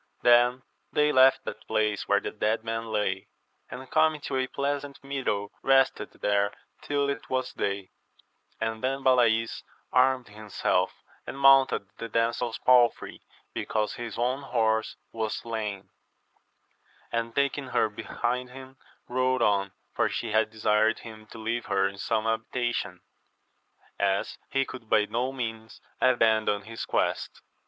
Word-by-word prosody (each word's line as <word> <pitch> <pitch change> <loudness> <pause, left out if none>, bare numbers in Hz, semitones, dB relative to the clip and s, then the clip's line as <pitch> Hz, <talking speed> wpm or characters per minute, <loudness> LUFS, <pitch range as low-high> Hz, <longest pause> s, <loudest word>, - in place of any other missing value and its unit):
— - - -41
Then 120 +1 +5 0.3
they 150 0 +3
left 130 -1 +5
that 110 - -7
place 105 -1 0
where - - +4
the - - -5
dead 110 +1 -1
men 115 0 -3
lay, 105 -3 -1 0.4
and 130 +1 -8
coming 155 -1 +3
to 140 - -4
a 130 0 0
pleasant 140 +1 -3
meadow 130 -7 -2
rested 135 0 +3
there 100 0 +1 0.3
till 140 -1 0
it 140 -4 -4
was 130 -1 -1
day; 100 -1 -3 0.7
and 110 0 -3
then 135 +1 -1
Balays 115 -3 +3 0.3
armed 130 -2 +3
himself, 105 -1 -1 0.4
and - - -6
mounted 135 -6 +5
the 115 - -5
damsel's 115 +1 0
palfrey, 125 -2 +3 0.3
because 105 -1 -1
his 120 -3 -6
own 125 +3 0
horse 110 -4 0 0.2
was 110 -1 -2
slain, 105 -4 -5 1.2
and 115 0 -2
taking 140 0 0
her 125 - +2
behind 120 +4 -3
him, 130 +1 -12 0.3
rode 130 0 +1
on, 100 -1 +2 0.2
for - - +1
she 115 - -3
had 110 0 +2
desired 110 0 +2
him 110 -1 -11
to 115 - -12
leave 115 +2 -3
her 95 -1 +2
in 100 0 -8
some 110 +1 0
habitation, 120 +2 -2 1.0
as 100 0 0
he 135 0 +1
could 120 -5 -10
by 105 - +4
no 125 +4 -1
means 115 -4 -6 0.2
abandon 110 -4 +3
his 115 +2 -6
quest. - - -1
115 Hz, 145 wpm, -27 LUFS, 110-130 Hz, 1.2 s, Then